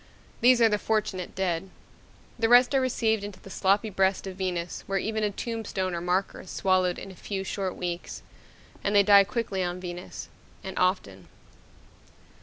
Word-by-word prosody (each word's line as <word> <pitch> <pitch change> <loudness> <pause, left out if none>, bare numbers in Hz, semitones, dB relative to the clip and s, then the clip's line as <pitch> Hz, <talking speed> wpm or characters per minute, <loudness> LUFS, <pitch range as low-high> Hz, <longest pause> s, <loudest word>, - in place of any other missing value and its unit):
These 245 0 +6
are - - +8
the 210 -1 +1
fortunate 210 -5 -2
dead. 185 -1 -1 0.7
The 225 -1 +2
rest 245 +2 +6
are 270 - +3
received 225 -4 +1
into 205 -2 -7
the 195 - -13
sloppy 200 +3 +1
breast 190 0 +1
of 190 -1 -6
Venus 180 -2 -3
where 195 - 0
even 220 +2 -1
a 210 - +2
tombstone 205 -4 -3
or 170 - -3
marker 180 +2 -1
is 185 - -13
swallowed 185 -2 +1
in 195 - -8
a - - -13
few, 195 +1 -4
short 190 -1 -3
weeks. 175 -1 -5 0.6
And 205 - 0
they 200 - +7
die 200 0 +7
quickly 220 -4 -2
on 175 0 -3
Venus, 175 -1 -7 0.4
and 190 0 -6
often. 100 - 0
195 Hz, 175 wpm, -27 LUFS, 185-215 Hz, 0.7 s, are